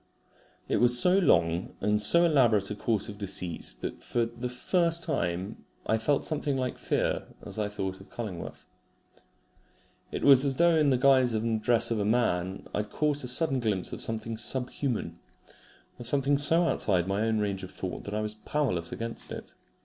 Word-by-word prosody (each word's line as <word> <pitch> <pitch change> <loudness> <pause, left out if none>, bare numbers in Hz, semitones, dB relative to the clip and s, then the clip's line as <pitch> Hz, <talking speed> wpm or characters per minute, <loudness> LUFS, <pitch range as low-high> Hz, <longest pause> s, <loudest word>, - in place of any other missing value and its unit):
It - - 0
was 120 0 +5
so 180 +6 +5
long 85 - +1
and 105 +1 +1
so 170 +11 +6
elaborate 115 - +3
a - - -3
course 105 -1 -1
of 105 -2 -9
deceit, 90 - -4
that - - -4
I - - -24
for 120 -1 -1
the 120 +2 -6
first 170 +6 +1
time 90 +2 -3 0.4
felt 140 +5 0
something 145 -3 -2
like 130 -1 -3
fear - - -1 0.2
as - - -7
I 105 - 0
thought 95 -2 -5
of 95 - -16
Cullingworth. 100 -8 -7 1.5
It - - -4
was 135 -2 +7
as 135 -2 0
though 170 +3 +4
in 150 -2 +3
the 130 - +3
guise 130 -2 +4
and 110 0 -1
dress 120 0 +2
of 115 - 0
a - - 0
man 95 -5 0
I - - -2
had 105 0 -3
caught 150 +1 -1
a - - -4
sudden 135 +1 +1
glimpse 105 -6 -2
of - - -4
something 115 0 -2
sub 125 +2 -1
human 110 -11 -3 0.8
of 120 - +1
something 140 +2 +2
so 165 +4 +5
outside 95 - 0
my 100 +2 -1
own 110 0 +1
range 100 -2 -2
of 95 - -8
thought 95 -1 -6
that 100 - -5
I 105 - -1
was 105 0 -4
powerless 110 - -2
against 115 0 -6
it. - - -8
115 Hz, 190 wpm, -28 LUFS, 100-135 Hz, 1.5 s, was